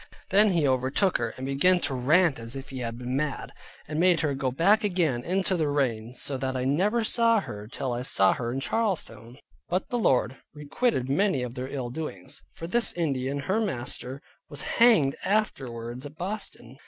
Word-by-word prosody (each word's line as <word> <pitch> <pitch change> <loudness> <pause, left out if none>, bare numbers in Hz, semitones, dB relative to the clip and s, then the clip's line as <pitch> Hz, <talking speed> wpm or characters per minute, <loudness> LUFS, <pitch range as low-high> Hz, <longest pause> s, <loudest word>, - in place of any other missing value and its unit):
Then 205 +2 +5
he 165 -6 +2
overtook 130 +9 +2
her, 115 -1 -1
and 130 - -5
began 160 +7 +3
to 140 - 0
rant 150 +3 +3
as 115 +2 -5
if 135 0 -8
he 130 - -5
had 115 -1 -4
been 125 +1 -4
mad, 145 +1 -2 0.4
and 155 +1 -3
made 175 -1 +4
her 150 -3 0
go 135 -1 -1
back 180 +12 +3
again 170 -11 +1
in 185 +6 0
the 175 -4 +1
rain; 125 -5 -1
so 135 +2 -1
that 130 0 -2
I 130 - -2
never 200 - +2
saw 230 0 +4
her 105 - -8
till 125 +2 -3
I 120 - -3
saw 95 -6 +3
her 120 -1 -3
in 135 +2 -3
Charlestown. 135 - -2 0.3
But 180 +1 -1
the 245 - -1
Lord 130 - +2 0.2
requited 150 - -1
many 145 -1 +1
of 120 -1 -5
their 125 +1 -5
ill 130 -3 -4
doings, 135 - -7
for 165 - -8
this 235 +7 +1
Indian 140 -4 -1
her 195 +8 0
master, 130 - -3 0.3
was 145 -2 -4
hanged 195 - +4
afterward 125 - -2
at 145 +1 -9
Boston. 175 - -6
140 Hz, 190 wpm, -27 LUFS, 125-185 Hz, 0.4 s, Then